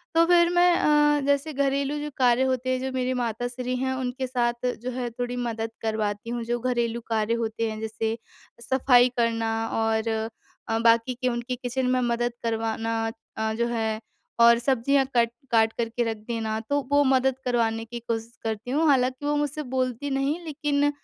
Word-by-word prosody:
तो 330 - +6
फिर 345 0 +5
मैं 355 0 +4
अ, 295 -2 +4
जैसे 285 +2 +1
घरेलू 280 +1 0
जो 300 0 -4
कार्य 250 0 +4
होते 255 -1 0
हैं 255 0 +1
जो 265 - -3
मेरी 255 0 -1
माताश्री 245 +1 -2
हैं 260 +1 -1
उनके 260 0 -3
साथ 240 -1 -1 0.2
जो 255 - -3
है 245 -1 -3
थोड़ी 245 +1 -4
मदद 225 -2 -3
करवाती 215 0 -2
हूँ। 240 -1 -3
जो 240 +1 -1
घरेलू 235 -1 -1
कार्य 220 0 +1
होते 230 -1 -1
हैं 215 - -6
जैसे 220 +1 -2 0.4
सफाई 250 0 +4
करना 225 -1 +1 0.3
और 225 0 0 0.6
अ, 225 - 0
बाकी 230 +2 +3
के 255 - +1
उनकी 240 +1 -3
किचन 250 +1 -2
में - - +2
मदद 240 0 0
करवाना 225 0 -1 0.4
अ, 220 0 0
जो 235 +2 0
है 220 -2 -1 0.4
और 235 0 +8
सब्जियाँ 270 +2 +2
कट 235 -1 +4 0.2
काट 225 -1 +4
कर 230 -1 -1
के 240 +1 -1
रख 225 -1 -2
देना 220 -2 -2
तो 285 0 +2
वो 285 0 +5
मदद 265 -1 +3
करवाने 225 -2 +1
की 235 +1 -7
कोशिश 230 0 -4
करती 220 +2 -3
हूँ। 310 +3 +2
हालाँकि 260 +1 +2
वो 295 0 +1
मुझसे 295 +1 -2
बोलती 255 +2 -1
नहीं 275 +4 0
लेकिन 290 -1 +1
245 Hz, 185 wpm, -25 LUFS, 230-265 Hz, 0.6 s, और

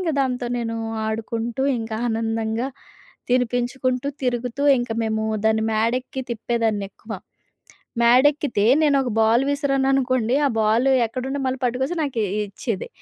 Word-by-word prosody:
ఇంక 345 -3 0
దాంతో 250 -2 -2
నేను 230 -1 -3 0.3
ఆడుకుంటూ, 225 +3 -3 0.2
ఇంకా 225 -1 -4
ఆనందంగా 225 +2 -1 0.6
తినిపించుకుంటూ, 250 +2 0
తిరుగుతూ, 250 +2 -2 0.2
ఇంకా 240 -1 -2
మేము 220 0 -1 0.2
దాన్ని 220 0 +2
మేడెక్కి 245 +4 -1
తిప్పేదాన్నెక్కువ. 220 -2 -2 0.9
మేడెక్కితే, 255 -1 +4 0.2
నేనొక 275 -4 +3
బాల్ 225 +4 +4
విసిరాననుకోండి. 270 -3 +1
ఆ - - 0
బాలు 230 +5 +3 0.2
ఎక్కడుంటే, 265 +4 -4
మళ్ళీ 260 0 -2
పట్టుకొచ్చి 260 +7 -1
నాకే 255 -7 -1 0.2
ఇచ్చేది. 200 +1 -4
245 Hz, 110 wpm, -22 LUFS, 225-265 Hz, 0.9 s, మేడెక్కితే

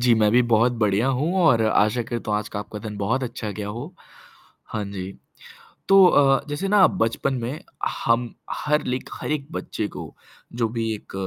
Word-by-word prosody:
जी, 120 -1 +4
मैं 105 -1 +3
भी 125 - +5
बहुत 115 +3 +4
बढ़िया 105 +4 +2
हूँ 160 +7 0
और 120 -9 +5
आशा 110 +2 +2
करता 115 -2 -4
आज 105 - -6
का 100 - -5
आपका 105 0 -7
दिन 105 -1 -7
बहुत 115 +7 0
अच्छा 115 -3 -4
गया 105 0 -5
हो। 125 - -7 0.7
हाँ 110 -2 -3
जी। 95 0 -5 0.8
तो 195 -1 +8
अ, 135 -4 +4
जैसे 145 +7 -2
ना 200 -1 +6
बचपन 135 -4 -1
में 125 +6 -4 0.5
हम 115 +1 +1 0.2
हर 150 0 0
लाइक 125 +1 -3
हर - - -5
एक 145 -2 -2
बच्चे 105 - -4
को - - -8 0.5
जो 115 - +3
भी 115 -1 -2
एक 105 - -14
120 Hz, 185 wpm, -23 LUFS, 110-140 Hz, 0.8 s, तो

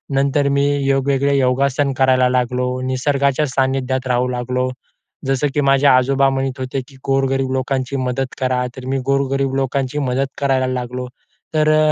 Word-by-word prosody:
नंतर 140 +1 +2
मी 140 0 +2 0.3
वेगवेगळे 140 +1 +1
योगासन 135 +2 +1
करायला 130 -1 +4
लागलो, 125 0 -1
निसर्गाच्या 140 +2 0
सानिध्यात 130 -1 -1
राहू 125 0 +1
लागलो. 125 +1 -1 0.6
जसं 135 +2 +1
की 145 - +2
माझे 135 0 +3
आजोबा 135 +1 +4
म्हणत 135 -1 -2
होते, 130 +1 -3
की 135 - -17
"गोरगरीब 135 -1 +1
लोकांची 130 0 -2
मदत 130 0 -2
करा." 125 -1 0
तर 130 - -8
मी 135 0 0
गोरगरीब 135 0 0
लोकांची 135 +1 -1
मदत 130 +2 0
करायला 135 -2 +1
लागलो. 125 0 -4 0.5
तर 155 0 +3
अ, 155 0 +4
135 Hz, 150 wpm, -19 LUFS, 130-140 Hz, 0.6 s, करायला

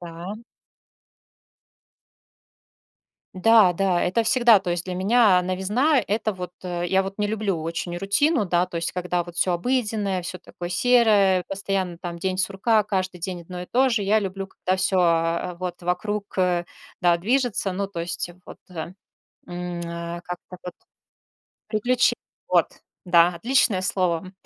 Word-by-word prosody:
Да. 175 +4 -8 3.0
Да. 210 0 +5
Да, 180 0 +1
это 210 +6 +1
всегда. 235 -1 +5
То 185 -2 -4
есть 175 0 -2
для 185 - -4
меня 195 0 +4
новизна- 210 - +1
это 215 +1 -1
вот, 180 -1 -7
э, 175 -1 -3
я 190 +2 +2
вот 195 +1 -6
не 205 - +1
люблю 205 -5 -2
очень 170 +1 -4
рутину, 210 - +1
да, 175 +1 +1
то 175 - -7
есть 165 - -2
когда 180 -1 -1
вот 175 0 -12
всё 180 0 +2
обыденное, 210 -2 -1
всё 180 +1 -6
такое 175 0 -8
серое, 205 -4 +4
постоянно 195 -3 -3
там 170 -1 -6
день 185 +1 -2
сурка, 210 +3 +2
каждый 185 -3 -2
день 175 -1 -5
одно 180 +1 -7
и - - -9
то 260 +2 +2
же. 225 -3 +1
Я 210 +3 +3
люблю, 195 -1 -4
когда 185 -1 -2
всё, 185 0 +1
э, 170 +1 +1
вот 180 -1 -5
вокруг, 200 +3 -3
э, 180 -1 +1 0.4
да, 175 -1 +4
движется. 235 -1 +1
Ну, 195 +2 -2
то 195 -3 -6
есть 170 +1 -3 0.2
вот - - -10
там, 175 -1 -7 0.5
м, 175 0 -5
а, 170 0 -6
как-то 180 +1 -8
вот 180 -1 -7 0.9
приключе 245 +3 +2 0.3
вот. - - +4 0.4
Да, 175 -1 +5
отличное 230 0 +2
слово. 185 -1 -1
185 Hz, 155 wpm, -24 LUFS, 175-210 Hz, 3.0 s, Да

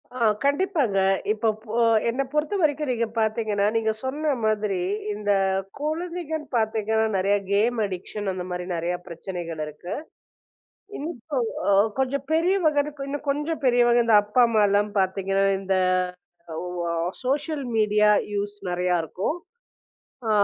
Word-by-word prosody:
ஆ, - - -5 0.3
கண்டிப்பாங்க. 285 - +1 0.3
இப்ப 220 +1 +1
போ 220 +1 -5 0.3
என்ன 250 +4 0
பொறுத்தவரைக்கும் 300 -2 +1
நீங்கப் 230 -1 -2
பாத்தீங்கன்னா, 215 -2 +1
நீங்கச் 220 -1 0
சொன்ன 295 +3 0
மாதிரி 210 -4 0 0.3
இந்தக் 195 -2 +1
குழந்தைகள் 320 0 -3
பாத்தீங்கன்னா 220 -1 +1
நிறைய 200 +2 +2 0.2
கேம் 225 +4 +2
அடிக்ஷன் 195 +2 -4
அந்தமாரி 180 -1 -4
நிறைய 170 +1 -1
பிரச்சனைகள் 170 -2 -6
இருக்கு. 150 +4 -7 1.0
இன்னும் 300 -1 -5 0.2
கொ - - +2 0.3
ஒ - - +5 0.3
கொஞ்சம் 265 +1 0
பெரியவங்கன்னு 320 -4 +2
இன்னும் 290 +1 -5
கொஞ்சம் 295 +3 -1
பெரியவங்க 240 -1 +4
இந்த 225 -2 +5
அப்பா, 210 +4 +3
அம்மா 220 -2 +2
எல்லாம் 205 +1 +2
பாத்தீங்கன்னா, 195 +1 +1 0.2
இந்த 195 0 0 0.8
அவ் 180 +2 -5
அ - - -1 0.3
சோசியல் 285 +2 -1
மீடியா 210 -1 +4 0.2
யூஸ் 205 0 -2
நிறையா 180 0 +1
இருக்கும். 190 - -2 0.9
ஆ, - - +2
220 Hz, 125 wpm, -25 LUFS, 195-285 Hz, 1.0 s, ஒ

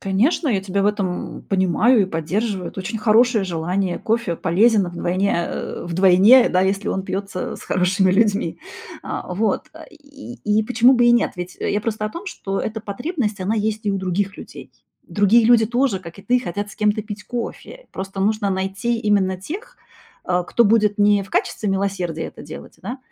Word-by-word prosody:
Конечно, 230 - +1
я 205 -6 +1
тебя 195 +1 -2
в - - +2
этом, 200 -4 -2
м, - - -14
понимаю 195 +5 +3
и - - +2
поддерживаю. 185 +3 -2
Это - - -7
очень 220 +4 -4
хорошее 225 0 +3
желание. 180 +1 -2
Кофе 225 -6 -1
полезен 205 +5 +3
вдвойне 180 +3 -1 0.2
э, - - -5
вдвойне, 190 +8 +5
да, 180 - +2
если 195 +2 0
он 190 - -1
пьется 190 0 -4
с - - -12
хорошими 185 +1 +1
людьми. 210 +2 +1 0.4
А, - - -5
вот. 210 +1 -1 0.2
И 285 -5 -12
и 210 +1 +2
почему 245 +3 +4
бы 240 -2 +4
и 240 - +6
нет? 240 - +2
Ведь 180 0 -6
я 205 - -1
просто 215 -1 -3
о 215 - -2
том, 340 - -8
что 195 - -4
эта 220 0 -4
потребность, 220 - -3
она 195 +4 0
есть 215 0 -2
и - - +2
у - - -1
других 190 +2 -2
людей. - - -11 0.3
Другие 210 +3 +3
люди 235 -1 +5
тоже, 240 -2 0
как 170 0 -12
и - - -11
ты, 250 +3 +2
хотят 205 -1 -4
с - - -14
кем-то 210 -1 +1
пить 210 0 -8
кофе, 245 - -6
просто 195 +1 -6
нужно 210 0 +1
найти 195 +5 -1
именно 200 -4 +1
тех, 360 - -8 0.5
э, 180 0 +2
кто 235 - +3
будет 210 -1 +3
не 205 -1 +4
в 195 - -13
качестве 210 - -1
милосердия 190 -4 -2
это - - -9
делать, - - -11
да, 250 +3 -5
205 Hz, 190 wpm, -21 LUFS, 190-225 Hz, 0.5 s, и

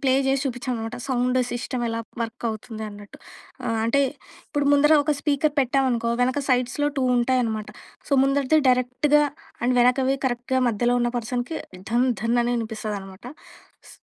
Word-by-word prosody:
Play 260 -1 +3
జేసి 270 0 +1
చూపిచ్చామనమాట, 245 -2 -4
sound 255 0 +1
సిస్టమెలా 240 -1 -2 0.2
వర్కవుతుంది 225 -1 -5
అన్నట్టు. 205 0 -12 0.5
ఆహ్, 225 -1 0
అంటే, 280 +5 +3 0.5
ఇప్పుడు 290 -1 -1
ముందర 295 +2 +5
ఒక 300 0 +1
స్పీకర్ 295 0 +1
పెట్టామనుకో, 255 -3 +1
వెనక 255 +3 +1
సైడ్స్‌లో 255 +3 +1
2 265 - +1
ఉంటాయనమాట. 235 -3 0 0.4
సో, - - -4
ముందరిది 280 +2 +2
డైరెక్ట్‌గా, 255 +4 +3 0.4
అండ్ 250 +1 +2
వెనకవి 260 +2 +3
కరెక్ట్‌గా 250 +1 -1
మధ్యలో 240 +3 +1
ఉన్న 240 - +1
పర్సన్‍కి 245 +6 -3 0.3
ధన్, 245 +2 +3
ధన్ 235 +1 +1
అని 240 +1 0
యినిపిస్తదనమాట. 215 -4 -5 0.7
స్ - - -15
245 Hz, 135 wpm, -24 LUFS, 230-270 Hz, 0.7 s, ముందర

